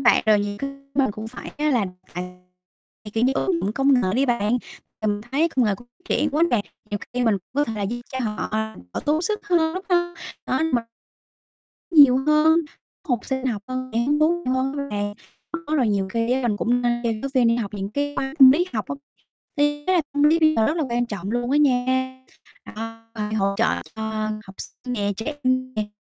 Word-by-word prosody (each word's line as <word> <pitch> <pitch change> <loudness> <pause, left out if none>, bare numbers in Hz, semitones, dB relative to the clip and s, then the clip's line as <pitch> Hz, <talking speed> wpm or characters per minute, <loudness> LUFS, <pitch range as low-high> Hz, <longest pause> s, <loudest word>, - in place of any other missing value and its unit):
Bạn, 240 - +6
rồi 215 -1 +5
nhiều 205 0 -3
cái 275 +3 -3 0.2
mình 270 -4 +3
cũng 215 +2 -7
phải 250 - -9
á 300 0 +2
là 235 -7 +2 1.3
kiểu 225 +2 +2
như, 260 - +3
ứng 360 +3 +1
dụng 205 - -1
công 270 +3 +3
nghệ 245 -7 +2
đi 270 +2 +2
bạn. 235 -1 +1 0.4
Mình 210 -1 0
thấy 310 +5 +3
công 260 -6 +1
nghệ 205 -2 +2
cũng 240 - -15 0.2
triển 300 - +1
quá 300 +4 +1
nè, 225 -4 +2 0.3
nhiều 205 - -1
khi 245 0 0
mình 220 -3 +4
cũng 180 - -37
có 290 +1 +3
thể 225 -6 -4
là 205 -1 -2 0.3
cho 260 - -2
họ 215 -3 -2 0.4
đỡ - - -1
tốt 305 +2 +2
sức 420 +2 -2
hơn, 335 -3 +2
đúng 375 - -4
hông? 345 -1 +1 0.3
Đó, 260 - 0
m 245 - +4 1.1
Nhiều 285 -6 +8
hơn, 310 +2 +5 0.5
học 245 -3 +2
sinh 265 -1 -2
học 215 -5 -2
hơn, 255 0 -4
sẽ - - +2
hứng 280 +5 +2
thú 340 +3 +2
nhiều 255 - 0
hơn 265 +2 -1
nữa 280 0 -3
nè. 205 0 -2 0.5
Đó, 310 +1 0
rồi 250 -6 +3
nhiều 195 -2 0
khi 230 +1 +1
á 260 +1 +1
mình 210 - 0
cũng 245 +3 +1
nên 240 0 +1
cho 235 - +1
giáo 225 +5 -3
viên 250 -2 +4
đi 230 +1 +3
học 210 -3 -3
những 195 0 -4
cái 285 +4 -2
khóa 270 +1 -2
tâm 265 -1 +10
lý 340 +7 +3
học - - -1
á, - - -2 0.6
thì 290 - +4 0.2
ý 370 - +3
là 345 - +3
tâm 290 0 +1
lý 310 +3 +5
bây 310 -1 +4
giờ 220 - +4
rất 310 - 0
là 330 - +1
quan 240 0 +1
trọng 200 -3 -5
luôn 240 +1 -1
á 290 - +4
nha. 260 -1 +1 0.5
Đó, 225 +1 -6
phải 215 -1 -3
hỗ 195 -1 +1
trợ - - +3 0.3
cho 220 0 -3 0.4
học 190 - -11
sinh 250 - -7
nè, 205 -4 0
trẻ 235 +8 -4
em 255 0 +1
nè 215 -1 -2
255 Hz, 230 wpm, -23 LUFS, 220-290 Hz, 1.3 s, tâm